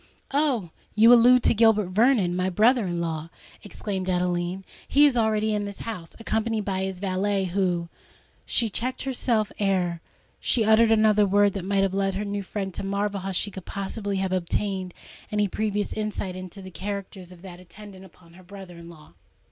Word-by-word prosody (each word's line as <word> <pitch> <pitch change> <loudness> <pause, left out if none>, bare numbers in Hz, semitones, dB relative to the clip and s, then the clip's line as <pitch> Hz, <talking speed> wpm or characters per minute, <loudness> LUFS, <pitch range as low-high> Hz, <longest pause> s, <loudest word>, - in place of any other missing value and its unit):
"Oh! 265 - +1 0.2
you 225 +3 +7
allude 245 +1 +6
to - - +4
Gilbert 215 -3 +3
Vernon—my 185 -4 +2
brother 220 +3 +3
in 175 -1 -2
law!" 165 -1 -3 0.3
exclaimed 195 -2 -5
Adeline. 180 +1 -1 0.2
"He 290 +2 +5
is 280 -4 +3
already 220 -2 +1
in 205 -1 -1
this 200 -1 -8
house—accompanied 220 +2 -3
by 190 -2 -2
his 190 -1 -4
valet, 195 +1 0
who——" 180 -2 -1 0.6
She 235 - 0
checked 245 +5 -3
herself 240 -5 0
ere 180 -4 0 0.4
she 225 -3 +1
uttered 220 +1 +5
another 215 -2 +4
word 205 0 +3
that 195 -3 -5
might 195 0 +1
have 195 -1 0
led 195 -1 0
her 205 +2 -3
new 200 0 -3
friend 195 -1 -5
to - - -5
marvel 200 +1 -2
how 195 +1 -4
she 200 +2 -2
could 190 -2 -9
possibly 200 +1 -4
have 190 -1 -1
obtained 185 +1 -2 0.4
any 210 -1 +1
previous 210 +1 -2
insight 210 -3 -3
into 185 +1 -9
the 185 - -10
character 200 +1 -6
of 180 -1 -13
that 180 -2 -10
attendant 190 +1 -13
upon 170 -2 -18
her 185 +1 -16
brother 185 -2 -11
in 170 0 -11
law. 155 - -15
195 Hz, 180 wpm, -25 LUFS, 185-215 Hz, 0.6 s, you